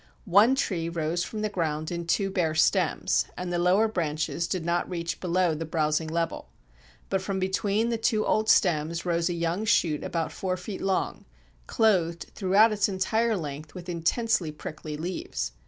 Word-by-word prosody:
One 210 +7 +5
tree 175 -11 -1
rose 170 +1 -1
from 215 +2 -5
the - - +2
ground 155 -4 -2
in 170 -1 -4
two 195 +3 +1
bare 165 -5 0
stems, 160 - +2
and 180 -1 -4
the 175 - 0
lower 185 +5 +4
branches 165 -3 -2
did 180 -3 -3
not 170 +1 0
reach 170 -2 -3
below 180 -1 +1
the 155 +1 -4
browsing 155 0 0
level. 165 +1 -2 0.6
But 190 -1 +1
from 195 0 -3
between 195 +4 0
the 230 -1 -1
two 220 -1 +1
old 215 0 +1
stems 165 -1 +2
rose 170 0 +1
a - - -1
young 170 +4 -1
shoot 170 -9 +2
about 165 -1 -2
four 185 -1 -2
feet 190 +2 -7
long, 190 -1 -1 0.4
clothed 175 -7 +1
throughout 205 +3 +4
its 210 -1 +1
entire 220 +4 +1
length 150 -1 -7
with 180 -1 -8
intensely 175 +2 0
prickly 150 0 -7
leaves. 155 - -4
175 Hz, 170 wpm, -27 LUFS, 165-200 Hz, 0.6 s, One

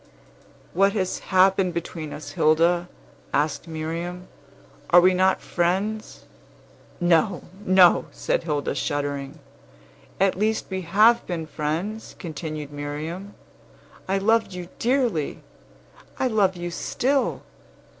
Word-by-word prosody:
"What 195 +3 +3
has 185 -4 -1
happened 190 -1 +3
between 165 -2 -5
us, 145 -1 -8
Hilda?" 170 +4 +2 0.5
asked 150 +3 0
Miriam. 165 +3 -5 0.6
"Are 175 - +8
we 185 +1 +5
not 190 +1 +2
friends?" 195 +5 -1 0.8
"No, 175 +2 +2 0.2
no!" 185 -1 +6
said - - -1
Hilda, 150 -4 -2
shuddering. 145 -2 -3 0.8
"At 195 0 +3
least 220 +1 +1
we 190 0 -2
have 215 +7 +4
been 170 -3 -3
friends," 160 +9 -4
continued 155 -3 -6
Miriam. 155 +7 -6 0.7
"I 195 +1 +1
loved 220 +1 +2
you 180 -1 -7
dearly! 240 - 0 0.7
I - - 0
love 205 -6 +2
you 175 0 -5
still! 265 +9 -1
175 Hz, 110 wpm, -24 LUFS, 160-195 Hz, 0.8 s, Are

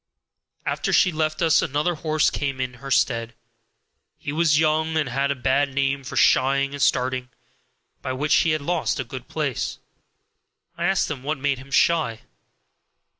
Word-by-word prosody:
After - - -1
she 180 - +4
left 155 +1 -1
us 160 -2 +4
another 150 +6 0
horse 155 -1 +1
came 140 -2 -3
in 130 -1 -2
her 135 - -7
stead. 115 -3 +1 0.8
He - - -5
was 155 -1 +3
young, 160 0 +1
and 155 -3 +1
had 135 +3 -1
a 140 - 0
bad 135 +1 0
name 140 0 0
for - - -6
shying 140 +1 +3
and 145 - -5
starting, 125 0 +1 0.7
by 130 - -3
which 145 +4 +2
he 165 - +3
had 155 -1 0
lost 170 0 -1
a - - -1
good 125 +1 -9
place. 150 -6 -3 1.0
I 170 - -3
asked 190 -3 +1
him 140 -5 -5
what 150 +3 -2
made 140 -1 -1
him 135 +2 -13
shy. 140 -6 +2
140 Hz, 170 wpm, -23 LUFS, 130-155 Hz, 1.0 s, she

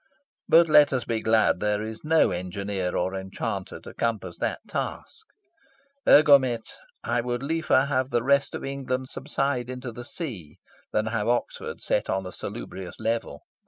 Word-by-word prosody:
But 165 +1 +7
let 150 -2 +6
us 130 -4 -1
be 115 -1 -1
glad 110 0 +3
there 105 0 0
is 110 0 -7
no 160 +1 +4
engineer 95 +1 -3
or 95 +2 -1
enchanter 95 0 -4
to - - -11
compass 115 -3 -2
that - - -1
task. 445 - -5 0.8
Egomet, 135 -6 +6 0.4
I 120 - 0
would 120 +1 -3
liefer 160 -2 +2
have 130 -2 0
the 120 -3 0
rest 140 +1 +2
of - - -5
England 130 -1 -3
subside 135 -3 -2
into 125 -1 -5
the 120 +2 -8
sea 120 - -7 0.3
than 110 - +1
have 110 -1 -1
Oxford 120 0 -2
set - - 0
on 95 0 -1
a 90 - -6
salubrious 95 0 -7
level. 115 -10 -2
120 Hz, 160 wpm, -26 LUFS, 105-135 Hz, 0.8 s, But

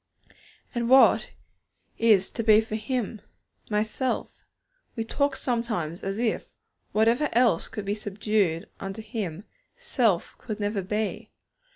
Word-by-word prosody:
And 235 -1 -1
what 265 +1 +6 0.7
is 215 -4 +4
to 230 - -3
be 215 -1 +7
for 220 -1 -4
Him? 220 -1 -2 0.5
My 210 -1 +2
self. 250 +4 -3 0.5
We 225 - -1
talk 280 +4 0
sometimes 220 - -2
as 195 +1 -3
if, 230 -1 -1 0.4
whatever 230 +7 +3
else 230 -7 +3
could 210 - -6
be 200 - 0
subdued 205 -4 0
unto 195 +3 -6
Him, 205 -5 -4 0.3
self 245 - +1
could 215 -3 -5
never 205 -1 -1
be. 210 +3 -3
215 Hz, 130 wpm, -26 LUFS, 200-235 Hz, 0.7 s, be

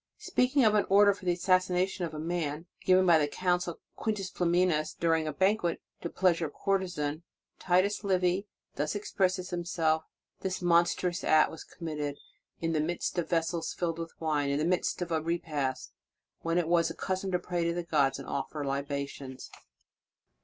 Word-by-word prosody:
Speak 250 +3 0
ing 265 - +6
of 215 - +5
an 210 - +2
order 200 +1 +6
for 195 -1 -13
the 180 - +3
assassination 185 0 +1
of 160 - -7
a - - -5
man, 160 -1 -2 0.2
given 185 0 +5
by 170 -3 +6
the 145 - +2
Consul 180 +1 -1 0.2
Quintius 210 -4 -2
Flaminius 175 -3 +1
during 165 -2 +1
a - - -1
banquet 190 +1 +1 0.2
to 170 - -3
please 175 -2 +2
a 160 - -1
courtezan, 175 -5 -1 0.4
Titus 190 +4 +2
Livy 185 0 +1 0.3
thus 150 +4 -1
expresses 185 -2 -1
himself: 165 -2 0 0.3
"This 190 -1 -2
mon 170 -1 +5
strous 175 0 -2
act 155 -1 +4
was 160 - -9
committed 150 -4 -5 0.4
in 165 0 -1
the 155 - +2
midst 175 +2 -2
of 170 - -3
vessels 165 0 -1
filled 170 -2 -2
with 165 0 -7
wine; 150 -3 0
in 140 - +1
the 150 - 0
midst 180 0 0
of 175 - -8
a 160 -1 +1
repast, 155 -5 -2 0.5
when 165 +1 -1
it 175 - +2
is 170 0 +3
the - - -5
custom 190 0 -2
to 180 - +2
pray 175 -1 -2
to 170 - +1
the 175 - -2
gods, 145 -5 +2
and 135 - -9
offer 145 +1 -3
libations. 140 -1 -4
170 Hz, 180 wpm, -30 LUFS, 155-185 Hz, 0.5 s, ing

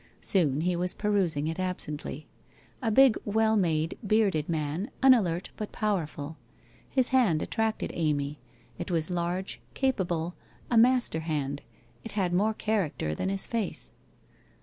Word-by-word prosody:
Soon 155 -7 +2
he 180 +1 +1
was 180 +1 -1
perusing 185 -8 0
it 165 +3 -3
absently. 155 -5 -3 0.6
A 230 - 0
big, 260 +2 +6
well 220 +1 +2
made, 165 -5 0
bearded 200 -8 +2
man, 160 - -2
unalert, 195 -10 +4
but 215 - -5
powerful. 160 -7 -2 0.5
His 260 -2 +2
hand 230 -13 +3
attracted 220 0 -1
Amy, 150 -3 -1 0.4
it 175 - -4
was 165 0 0
large, 180 +2 -2
capable, 180 -10 0 0.4
a - - +3
master 240 -6 +4
hand, 145 -3 -2 0.4
it 225 - -7
had 190 -4 0
more 210 +4 +2
character 190 - -1
than 190 - -2
hi; 195 - -1
face. 225 +1 -1
180 Hz, 135 wpm, -28 LUFS, 160-215 Hz, 0.6 s, big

